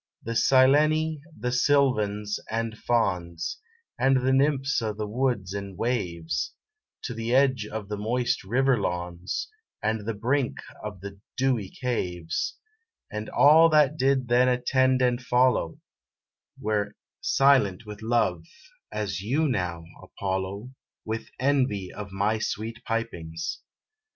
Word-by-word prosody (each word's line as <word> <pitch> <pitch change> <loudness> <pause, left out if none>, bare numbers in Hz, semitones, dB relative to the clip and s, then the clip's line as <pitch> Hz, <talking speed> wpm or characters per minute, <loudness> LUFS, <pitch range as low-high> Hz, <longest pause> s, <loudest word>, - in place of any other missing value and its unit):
The 115 - -4
Sileni, 150 +6 +4 0.2
and 125 0 0
Sylvans, 110 -7 +2
and 115 0 -2
Fauns, 90 -8 -1 0.4
And 135 -1 +3
the 130 - +3
Nymphs 135 0 +2
of 110 -2 -3
the 105 - -2
woods 110 -4 -1
and 100 -2 -6
waves, 90 -9 -2 0.5
To 120 - -4
the 115 +2 -1
edge 130 -5 +3
of 110 -2 -6
the 105 0 -4
moist 120 +4 0
river 125 +4 +2
lawns, 90 0 -3 0.3
And 110 -1 -2
the 115 - -1
brink 125 +5 0 0.3
of 105 -4 -6
the 100 0 -8 0.2
dewy 125 -7 +1
caves, 90 -9 -3 0.5
And 110 0 -5
all 160 +3 +7
that 150 -2 +4
did 135 -3 +2
then 120 +1 +4
attend 130 +1 +2
and 125 0 +2
follow, 125 -9 +2 0.8
Were 105 -1 -1 0.3
silent 130 -7 +3
with 105 0 -9
love, 110 -7 +1 0.5
as 100 -3 -3
you 140 +10 +1
now, 90 - -2 0.2
Apollo, 95 +4 -4 0.3
With 110 +1 -4
envy 130 -8 +1
of 105 -1 -7
my 100 +3 0
sweet 115 +2 -4
pipings. 85 -8 -3
115 Hz, 125 wpm, -26 LUFS, 100-130 Hz, 0.8 s, all